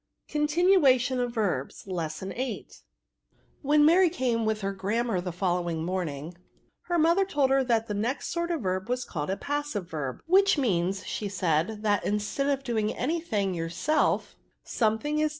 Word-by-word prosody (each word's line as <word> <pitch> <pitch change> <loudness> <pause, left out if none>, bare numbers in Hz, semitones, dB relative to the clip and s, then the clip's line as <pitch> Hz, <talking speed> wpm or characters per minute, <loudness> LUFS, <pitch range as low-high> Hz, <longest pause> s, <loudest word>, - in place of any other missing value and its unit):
CONTINUATION 295 -5 +3
OF 245 -1 -1
VERBS. 195 - -2
Lesson 175 -1 -4
VIII. 250 -4 -4 0.9
When 295 +1 +4
Mary 350 +3 +6
came 245 -8 0
with 215 0 0
her 195 0 -2
grammar 205 +1 -1
the 180 0 -4
following 175 -2 -1
morning, 170 -3 -4 0.5
her 350 - 0
mother 335 +4 +4
told 285 -8 +1
her 270 0 +4
that 230 -3 +1
the 210 - -3
next 230 +7 -2
sort 340 0 -2
of 335 -5 -1
verb 190 +2 -2
was 250 0 -1
called 150 -1 -4
a 190 - -1
ptusive 290 -9 -3
verb, 145 -6 -4
*^ - - -21
which 390 +2 +4
means,^ 190 -8 +1 0.4
said 165 -3 +1
she, 220 - -5
that, 205 -1 +2
instead 210 +7 -1
of 275 -1 0
doing 220 -4 0
any 320 +7 -1
thing 200 - -1
yourself^ 175 - 0 0.3
something 235 +7 0
is 310 - +3
VERSA.' - - +1
225 Hz, 170 wpm, -27 LUFS, 185-290 Hz, 0.9 s, Mary